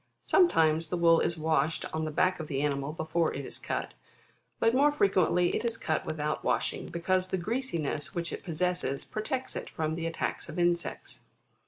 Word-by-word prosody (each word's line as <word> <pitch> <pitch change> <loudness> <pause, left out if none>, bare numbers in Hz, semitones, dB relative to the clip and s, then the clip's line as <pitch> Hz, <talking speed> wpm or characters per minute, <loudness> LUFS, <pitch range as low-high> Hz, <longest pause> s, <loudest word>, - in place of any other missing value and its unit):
Sometimes, 165 - +4
the 180 - -2
wool 165 -1 +5
is 170 - 0
washed 160 0 +1
on 160 0 -1
the - - -2
back 185 +4 +2
of 160 - -5
the 140 -1 -1
animal 140 0 -1
before 160 +1 0
it 140 0 -4
is - - -8
cut; - - -3 0.7
but 225 +1 +3
more 285 +3 +5
fre 290 -8 +3
quently 180 -2 +2
it - - -1
is 230 -1 -1
cut 155 - -1
without 150 -1 -2
washing, - - 0
because 185 +2 0
the 190 - -1
greasiness 170 - -2
which 170 -1 -2
it - - -6
possesses 175 -5 -1
protects 255 +5 -3
it - - -5
from 155 0 -2
the 165 0 -2
attacks 165 +1 -3
of 155 - -7
insects. 175 -1 -1
170 Hz, 190 wpm, -29 LUFS, 155-185 Hz, 0.7 s, wool